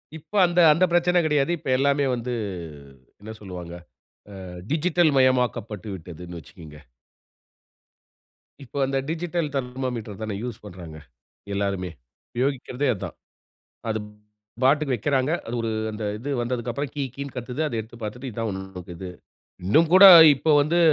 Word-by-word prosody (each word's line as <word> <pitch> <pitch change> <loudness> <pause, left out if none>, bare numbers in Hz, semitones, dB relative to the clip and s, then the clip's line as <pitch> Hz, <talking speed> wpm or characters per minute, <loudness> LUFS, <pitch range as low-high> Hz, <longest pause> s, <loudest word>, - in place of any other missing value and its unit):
இப்ப 160 +5 -14
அந்த 175 +1 0
அந்த 165 +4 +1
பிரச்சனை 175 +1 +3
கிடையாது. 150 0 +2
இப்ப 140 - -7
எல்லாமே 140 +1 +2
வந்து, 120 +1 -4 0.9
என்ன 110 - -8
சொல்வாங்க? 90 -4 -8 0.7
ஆ, - - -8 0.2
டிஜிட்டல் 165 +1 +2
மயமாக்கப்பட்டு 125 -6 +1
விட்டதுனு 85 0 -9
வச்சுக்கங்க. 75 0 -13 1.9
இப்ப 135 - -17
அந்த 135 0 -1
டிஜிட்டல் 170 0 -2
தெர்மாமீட்டர் 125 -5 -4
தான 110 -2 -3
யூஸ் 120 -4 -6
பண்றாங்க 85 -5 -10 0.6
எல்லாருமே. 100 -2 -2 0.5
யோகிக்கிறதே 135 0 -1
அதான். 95 - -7 0.7
அது 110 0 0 0.7
பாட்டுக்கு 140 0 +3
வக்கிறாங்க. 130 +4 0 0.2
அது 115 - -5
ஒரு 115 - -1 0.2
அந்த 105 0 -5
இது 135 +6 -5
வந்ததுக்கு 120 0 -2
அப்புறம், 140 +3 -4
கீ 145 - -2
கீனு 140 -1 -7
கத்துது. 125 +4 -4
அத 140 - -4
எடுத்துப் 115 +2 -12
பாத்துட்டு, 125 +5 -5
இது 115 - -11
தான் 115 -1 -1
உன்னோடதது. 95 -2 -8 0.6
இன்னும் 155 - +4
கூட 190 +2 +10 0.3
இப்ப 155 +3 +2
வந்து, 160 +4 +1
125 Hz, 135 wpm, -24 LUFS, 100-145 Hz, 1.9 s, கூட